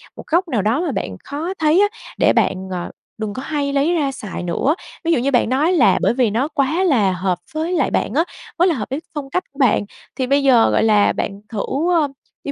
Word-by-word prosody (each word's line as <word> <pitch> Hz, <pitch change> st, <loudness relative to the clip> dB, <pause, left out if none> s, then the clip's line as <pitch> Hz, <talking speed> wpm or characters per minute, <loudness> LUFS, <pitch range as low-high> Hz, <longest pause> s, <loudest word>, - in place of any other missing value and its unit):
một -, -, -9 dB
góc 350 Hz, +3 st, +1 dB
nào 235 Hz, -9 st, 0 dB
đó 225 Hz, -, +1 dB
mà 345 Hz, -4 st, -1 dB
bạn 95 Hz, -, -4 dB
khó 315 Hz, +6 st, -4 dB
thấy 315 Hz, +4 st, +4 dB
á, 410 Hz, -, +5 dB, 0.3 s
để -, -, +4 dB
bạn, -, -, +2 dB, 0.2 s
ờ, 180 Hz, -1 st, -4 dB, 0.3 s
đừng 215 Hz, -2 st, -4 dB
có 255 Hz, -, -5 dB
hay 285 Hz, -2 st, -2 dB
lấy 285 Hz, +5 st, +2 dB
ra 290 Hz, -5 st, 0 dB
xài 210 Hz, -8 st, -6 dB
nữa. 180 Hz, -, 0 dB, 0.3 s
Ví 335 Hz, -, +1 dB
dụ 325 Hz, -, +3 dB
như 270 Hz, +3 st, 0 dB
bạn 245 Hz, -2 st, +2 dB
nói 300 Hz, +8 st, +2 dB
là, 345 Hz, -, +4 dB
bởi -, -, +2 dB
vì 245 Hz, -2 st, +2 dB
nó 235 Hz, +8 st, 0 dB
quá 310 Hz, +4 st, 0 dB
là 230 Hz, -, +3 dB
hợp 180 Hz, 0 st, -1 dB
với 320 Hz, +3 st, -2 dB
lại 300 Hz, -7 st, +1 dB
bạn -, -, -1 dB
á, 320 Hz, +5 st, +3 dB, 0.3 s
quá 355 Hz, +2 st, +4 dB
là 340 Hz, -, +2 dB
hợp 215 Hz, -6 st, -5 dB
với 270 Hz, +3 st, -2 dB, 0.2 s
phong 285 Hz, -2 st, -5 dB
cách 365 Hz, +6 st, -1 dB
của -, -, -20 dB
bạn, 250 Hz, -5 st, +3 dB, 0.3 s
thì 260 Hz, -, -2 dB
bây 280 Hz, +2 st, +2 dB
giờ, 250 Hz, -4 st, +5 dB
gọi -, -, +2 dB
là, 210 Hz, -2 st, +4 dB
bạn 200 Hz, 0 st, -4 dB
thử, 215 Hz, -3 st, -4 dB, 0.3 s
ơ, 320 Hz, -4 st, +3 dB, 0.4 s
đi, 285 Hz, -, -3 dB
275 Hz, 250 wpm, -19 LUFS, 220-315 Hz, 0.4 s, á